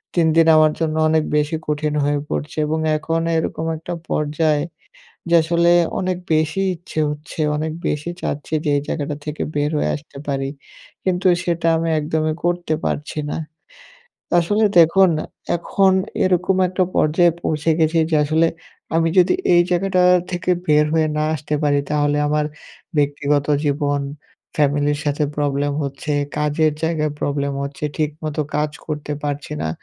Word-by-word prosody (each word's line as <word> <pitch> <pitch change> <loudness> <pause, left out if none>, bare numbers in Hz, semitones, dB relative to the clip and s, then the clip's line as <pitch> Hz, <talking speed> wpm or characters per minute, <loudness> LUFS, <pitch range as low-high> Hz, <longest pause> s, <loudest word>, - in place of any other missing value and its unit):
দিন-দিন 165 -1 +4
আমার 155 0 +5
জন্য 160 -1 -1
অনেক 160 0 +3
বেশি 150 +2 0
কঠিন 150 0 -1
হয়ে 145 0 +1
পড়ছে 150 - -4
এবং 160 +1 -1 0.2
এখন 165 +1 -1 0.2
এরকম 160 0 -2
একটা 165 +3 -6 0.2
পর্যায়, 150 0 +1 0.7
যে - - +4
আসলে 170 +1 +2 0.3
অনেক 185 -1 -1 0.2
বেশি 155 +4 +1
ইচ্ছে 165 -2 -5
হচ্ছে। 150 +2 -7 0.2
অনেক 155 +1 -2 0.2
বেশি 150 +3 -2
চাচ্ছি 145 +2 -3
যে 150 - +1
এই 140 - 0
জায়গাটা 145 -1 -3
থেকে 150 0 -4
বের 145 0 +1
হয়ে - - 0
আসতে 145 -1 -13
পারি। 135 -1 -1 0.6
কিন্তু 185 0 0 0.2
সেটা 170 -1 0
আমি 165 +1 -1
একদমই 155 +1 -1
করতে 175 -2 0
পারছি 150 +1 -3
না। - - -2 0.9
তা - - -4
আসলে 210 +6 +2
দেখুন, 175 +3 +5 0.5
এখন 190 +3 +2 0.3
এরকম 185 +1 +2
একটা 185 +1 0
পর্যায়ে 170 +3 +4
পৌঁছে 155 +1 0
গেছি 160 +1 +3
যে - - +3
আসলে, 160 +2 +3 0.5
আমি 165 0 +3
যদি 180 0 +5 0.2
এই 175 - +7
জায়গাটা 185 +1 +2 0.3
থেকে 180 +1 -1 0.2
বের 150 0 +4
হয়ে 160 -1 +3
না 150 - +1
আসতে 150 0 -3
পারি, 145 -1 +3
তাহলে 145 0 +1
আমার 150 0 +1 0.5
ব্যক্তিগত 145 0 +1 0.2
জীবন, 145 0 0 0.6
ফ্যামিলির 145 0 +2
সাথে 145 +1 0
প্রবলেম 145 0 0
হচ্ছে, 140 +2 -4 0.3
কাজের 150 +1 +2
জায়গায় 155 -2 0
প্রবলেম 140 0 -1
হচ্ছে, 140 +1 -5
ঠিক 155 -2 +1
মতো 155 0 -2
কাজ 150 0 0 0.2
করতে 150 -1 -4
পারছি 145 +1 -3
না। 80 - -1
155 Hz, 155 wpm, -20 LUFS, 145-165 Hz, 0.9 s, এই